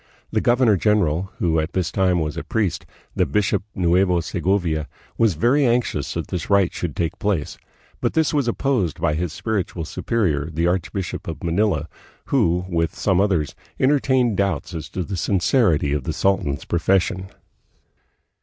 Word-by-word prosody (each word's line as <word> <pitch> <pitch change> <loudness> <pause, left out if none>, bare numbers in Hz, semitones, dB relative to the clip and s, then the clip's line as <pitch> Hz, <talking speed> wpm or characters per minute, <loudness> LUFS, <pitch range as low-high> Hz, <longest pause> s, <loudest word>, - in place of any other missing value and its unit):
The - - +1
governor 120 -4 +4
general, 95 -3 +1
who 80 -2 +1
at 80 +3 -3
this 90 -3 -1
time 95 -2 +2
was 75 0 -3
a 85 - -4
priest, 105 -6 -1 0.3
the - - +2
bishop 105 -2 +1
of - - -4
Nueva 90 0 +3
Segovia, 85 -6 0 0.3
was 110 -7 +2
very 125 - +3
anxious 120 -1 0
that - - -2
the 90 -3 -3
rite 100 -3 +3
should 85 -5 -4
take 85 -2 -2
place; 95 -8 -1 0.4
but - - -1
this 160 -1 +2
was 140 -4 +1
opposed 120 - 0
by 80 -2 +1
his 85 +1 -2
spiritual 95 -3 -3
superior, 80 -7 -1
the 80 +2 -1
archbishop 90 +1 -2
of - - -6
Manila, 85 -3 +1 0.5
who, 90 +2 +2
with 85 -2 -1
some 95 -2 +2
others, 90 -8 +1 0.3
entertained 130 -5 +2
doubts 100 -7 -1
as 80 - -6
to 90 - -3
the 95 +1 -5
sincerity 90 - +2
of 70 -4 -2
the - - -2
sultan's 85 -7 0
profession. 95 +2 +1
90 Hz, 165 wpm, -22 LUFS, 85-105 Hz, 0.5 s, governor